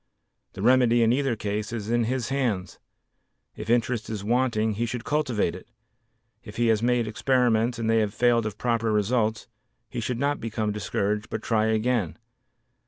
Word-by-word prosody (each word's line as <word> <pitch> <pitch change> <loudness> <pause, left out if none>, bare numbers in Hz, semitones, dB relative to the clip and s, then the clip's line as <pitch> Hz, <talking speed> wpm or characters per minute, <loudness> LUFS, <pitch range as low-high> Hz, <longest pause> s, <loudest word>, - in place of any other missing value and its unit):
The 95 - -6
remedy 120 -1 +4
in 115 +1 +4
either 135 -2 0
case 105 0 -3
is 110 -2 -4
in 120 -1 +2
his 125 0 -2
hands. 120 -9 -2 0.8
If - - -7
interest 120 -1 +1
is 105 -3 -4
wanting 115 -1 +1
he 115 +3 -2
should 120 0 -4
cultivate 130 - 0
it; - - -11 0.8
if - - -11
he 120 -1 +2
has 110 -1 +2
made 120 -1 +1
experiments 120 0 +1
and 115 -1 -2
they 115 0 +3
have 105 -2 0
failed 115 0 +2
of 105 -1 -6
proper 115 -2 0
results, 110 +1 0 0.4
he - - -4
should 120 +1 -2
not 145 +3 0
become 110 -2 -2
discouraged 105 +1 -2
but 110 - -4
try 110 -1 +1
again. 110 -4 0
115 Hz, 170 wpm, -26 LUFS, 110-125 Hz, 0.8 s, remedy